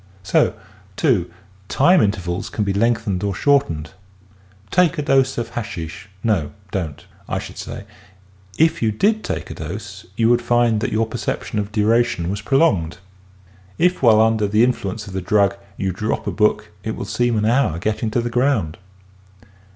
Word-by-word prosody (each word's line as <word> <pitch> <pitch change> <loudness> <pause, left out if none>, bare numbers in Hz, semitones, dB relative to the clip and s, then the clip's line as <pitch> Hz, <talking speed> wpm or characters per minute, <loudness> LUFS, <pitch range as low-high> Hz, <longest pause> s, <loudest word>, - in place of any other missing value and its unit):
So, - - +2 0.4
too, 90 0 +1 0.4
time 175 +6 +4
intervals 90 -4 -1
can 105 - -2
be 100 -1 0
lengthened 105 -3 0
or 100 -2 -1
short 140 +6 +3
ened. 75 -1 -5 0.8
Take 175 -3 +3
a 150 - -1
dose 135 -1 +2
of 115 -1 -3
hashish 100 -5 -6
— 95 - -30
no, 90 -10 0 0.2
don't 80 -7 -4
— - - -23
I - - -1
should - - -7
say, - - -7 0.7
if 160 +1 +3
you 110 -2 +2
did 215 - +1
take - - -4
a - - -4
dose - - -7
you 115 - +3
would 120 0 +4
find 120 -2 +2
that - - -1
your 110 +1 +1
perception 110 -1 -3
of 105 0 -3
duration 105 -5 +1
was 100 +1 -4
prolonged. 100 - +2 0.8
If 180 +1 +2
while 110 -4 +6
under 110 -2 +2
the 105 +3 +3
influence 110 -4 -1
of 95 - -9
the 95 - -2
drug 100 +1 +2 0.2
you 95 -1 -1
drop 105 +4 -2
a - - -1
book - - +1
it - - -3
will - - -5
seem 120 -2 0
an 105 - +1
hour 115 - +2
getting 110 +4 -1
to 120 +2 0
the 120 0 -3
ground. 120 - +1
110 Hz, 180 wpm, -20 LUFS, 100-120 Hz, 0.8 s, while